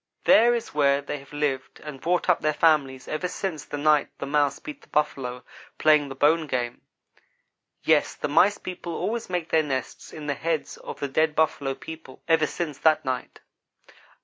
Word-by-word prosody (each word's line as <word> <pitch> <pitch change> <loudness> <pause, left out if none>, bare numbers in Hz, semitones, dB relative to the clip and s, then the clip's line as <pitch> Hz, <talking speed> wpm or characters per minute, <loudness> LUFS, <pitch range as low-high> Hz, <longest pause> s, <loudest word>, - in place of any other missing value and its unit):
There 240 +2 +6
is 235 - -5
where 140 -1 +3
they 145 +1 -5
have 140 - -16
lived 145 -3 -2
and 150 -3 -9
brought 175 +1 0
up 180 - +3
their 155 -1 +1
families 140 -5 +2
ever 155 +4 -2
since 180 -4 -4
the 145 - -5
night 150 0 +3
the - - -5
Mouse 145 0 +1
beat 150 - -9
the - - -20
Buffalo 125 -4 -1 0.3
playing 150 -2 +4
the 135 - -7
bone 155 +3 +3
game. 120 -3 -2 1.0
Yes - - +3
the - - -3
Mice 195 +8 +4
people 175 -2 -6
always 230 -1 -3
make 175 -2 -2
their 160 - +4
nests 135 -4 -4
in 155 - -8
the 145 - 0
heads 160 +1 -3
of - - -9
the 140 - -2
dead 155 +3 +1
Buffalo 145 -4 +1
people, 160 -4 -10
ever 160 -2 +3
since 155 -5 -4
that 155 -2 +3
night. 130 -1 -4
150 Hz, 185 wpm, -25 LUFS, 140-160 Hz, 1.0 s, There